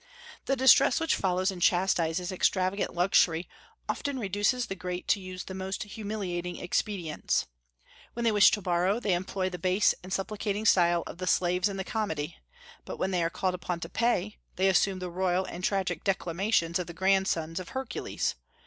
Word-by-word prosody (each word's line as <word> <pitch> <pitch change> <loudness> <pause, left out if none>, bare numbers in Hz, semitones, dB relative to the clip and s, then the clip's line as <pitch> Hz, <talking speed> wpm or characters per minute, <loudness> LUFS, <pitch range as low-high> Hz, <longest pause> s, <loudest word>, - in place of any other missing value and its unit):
The 270 - +1
distress 265 +2 +6
which 325 0 +1
follows 185 +1 0
and 180 -2 -8
chastises 175 0 +2
extravagant 185 +1 0
luxury 175 -1 +3 0.4
often 285 -2 -2
reduces 205 +3 0
the 195 - -4
great 180 -1 -5
to - - +3
use 185 -1 -7
the 190 - -8
most 190 +1 -4
humiliating 200 -4 -4
expedients. 180 -3 -1 0.7
When 235 - -4
they 230 - +4
wish 205 -2 +7
to 210 -4 -1
borrow, 180 +4 +1
they 210 -6 0
employ 185 +1 -2
the 180 - -6
base 185 +4 +3
and 185 - -11
supplicating 205 +2 -2
style 175 -4 +4
of - - -9
the 185 - -4
slaves 180 +2 +2
in 195 - -5
the 190 - -2
comedy; 170 -8 -3 0.5
but - - -7
when 190 - -1
they 180 -2 +1
are 165 - +1
called 185 +2 -1
upon 180 -1 -4
to - - -5
pay, 215 -3 0 0.2
they 190 +1 +3
assume 190 +1 +2
the 180 -1 -5
royal 185 +1 0
and 180 0 -7
tragic 180 -4 -1
declamations 185 -1 0
of 180 - -4
the 170 - -9
grandsons 190 -3 +1
of 185 - -8
Hercules. 265 0 -3
185 Hz, 180 wpm, -28 LUFS, 175-200 Hz, 0.7 s, wish